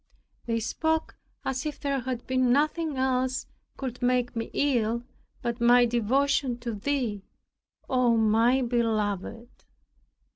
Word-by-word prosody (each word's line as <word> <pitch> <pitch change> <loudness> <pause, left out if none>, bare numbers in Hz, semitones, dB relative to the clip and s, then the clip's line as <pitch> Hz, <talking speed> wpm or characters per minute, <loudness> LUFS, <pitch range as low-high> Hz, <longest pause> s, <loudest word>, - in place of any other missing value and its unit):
They 230 -1 0
spoke 320 +7 -1 0.3
as 265 -1 -2
if 300 -1 -4
there 280 -2 -1
had 250 -1 -4
been 255 -1 +2
nothing 305 +2 +1
else 260 0 0 0.3
could 255 -2 -5
make 245 -1 +1
me 230 0 -3
ill, 235 -4 +1 0.4
but 235 0 -3
my 245 +1 +6
devotion 245 +2 +1
to 235 -1 -3
Thee, 225 -2 -2 0.7
O 250 -3 +3
my 225 +4 +3
Beloved! 230 -1 -2
245 Hz, 120 wpm, -27 LUFS, 230-265 Hz, 0.7 s, my